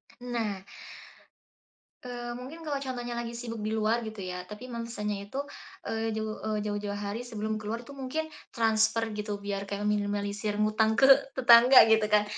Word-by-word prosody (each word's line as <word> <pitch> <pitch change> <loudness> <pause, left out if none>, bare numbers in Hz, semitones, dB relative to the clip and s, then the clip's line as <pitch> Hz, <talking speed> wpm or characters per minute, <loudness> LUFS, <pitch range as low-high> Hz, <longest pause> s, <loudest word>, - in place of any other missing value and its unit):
Nah, 230 -6 -3 1.4
eee, 240 -1 -5
mungkin 280 +7 -9
kalau 295 -3 -2
contohnya 245 -3 -4
lagi 235 0 -4
sibuk 235 -1 -6
di 220 - -1
luar 220 +1 +1
gitu 215 -2 -7
ya 180 0 -5
tapi 210 +6 -9
memesannya 210 -4 -4
itu, 265 +7 -4 0.5
eee, 225 0 -1
jauh, 215 0 -3
eee, 215 -1 0
jauh-jauh 205 -1 -3
hari 205 +4 -4
sebelum 215 -2 -3
keluar 220 +2 -4
itu 245 - -14
mungkin 310 +4 -3 0.2
transfer 225 0 +2
gitu 210 0 -4
biar 200 0 -3
kayak 200 0 -4
meminimalisir 205 0 -1
ngutang 215 +1 +2
ke 270 +4 +5 0.3
tetangga 245 0 +8
gitu 220 -1 +5
kan 210 0 +4
220 Hz, 160 wpm, -29 LUFS, 210-240 Hz, 1.4 s, tetangga